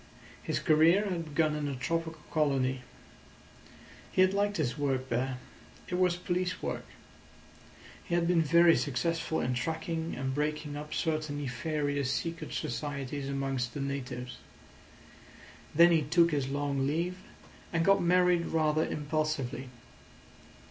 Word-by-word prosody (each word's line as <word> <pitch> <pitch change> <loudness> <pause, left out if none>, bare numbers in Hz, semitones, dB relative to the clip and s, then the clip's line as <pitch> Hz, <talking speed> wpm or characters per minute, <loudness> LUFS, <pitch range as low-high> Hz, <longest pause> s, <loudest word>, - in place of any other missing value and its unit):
His - - -2
career 165 +7 +4
had 175 -4 -2
begun 155 0 +1
in 150 -1 -2
a 140 - -3
tropical 165 +5 -3
colony. 135 -4 +1 1.3
He 185 - +5
had 185 +1 +3
liked 205 +1 +1
his 130 -7 0
work 135 -2 -1
there. 125 +2 -1 0.5
It - - -5
was 180 -1 +3
police 180 +1 -2
work. - - -4 1.2
He 170 - -1
had 170 -1 +2
been 175 -2 +4
very 170 +2 +6
successful 160 +4 -1
in 125 - 0
tracking 160 +5 -2
and 130 +1 -2
breaking 150 +1 -2
up 150 +1 -7
certain 155 -2 -1
nefarious 145 0 -1
secret 165 +3 -3
societies 140 -1 -3
amongst 135 -3 -2
the - - -3
natives. 125 -3 -4 1.4
Then 170 +2 +7
he 165 -2 +4
took 165 +3 +3
his 140 -3 0
long 140 -1 -1
leave, 170 +5 -1 0.5
and 165 -1 +1
got 195 0 +5
married 180 0 +3
rather 155 -1 +2
impulsively. 150 -3 -2
155 Hz, 135 wpm, -30 LUFS, 140-170 Hz, 1.4 s, Then